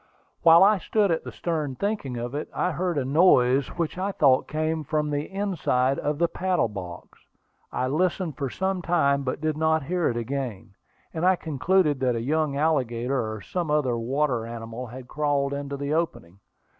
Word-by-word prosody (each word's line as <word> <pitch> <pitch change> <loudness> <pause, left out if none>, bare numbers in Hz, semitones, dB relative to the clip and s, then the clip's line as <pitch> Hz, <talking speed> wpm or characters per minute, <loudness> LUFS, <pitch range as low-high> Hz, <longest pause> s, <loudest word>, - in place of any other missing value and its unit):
While 165 +1 +8
I 205 0 +5
stood 205 0 +1
at 165 - 0
the - - -7
stern 155 -6 -3
thinking 200 - -2
of 120 +2 -4
it, 145 - -4
I 180 - 0
heard 175 0 -2
a 135 - 0
noise 135 -3 +4
which 170 +1 -3
I 195 +2 -1
thought 135 -8 +3
came 155 +1 -1
from 150 0 -1
the 145 +1 -2
inside 165 -10 0
of 150 0 -1
the 170 +2 +2
paddle 180 -9 0
box. 90 -4 -9 0.5
I 130 - -1
listened 170 +2 0
for 135 -1 -3
some 190 +5 -2
time 140 -5 +2
but 135 +1 -3
did 155 -1 0
not 160 -1 +2
hear 175 +3 0
it 120 - -2
again, 120 -5 -4 0.4
and 160 - -3
I 185 +1 +5
concluded 160 -1 +1
that 125 -2 +1
a - - -1
young 150 +2 0
alligator, 125 -5 0
or 110 -1 -6
some 175 - -3
other 150 -5 +1
water 125 +1 0
animal, 115 +1 -7
had 125 +2 -10
crawled 145 -1 0
into 140 0 -4
the 140 +1 -2
opening. 100 - -3
145 Hz, 185 wpm, -25 LUFS, 125-170 Hz, 0.5 s, While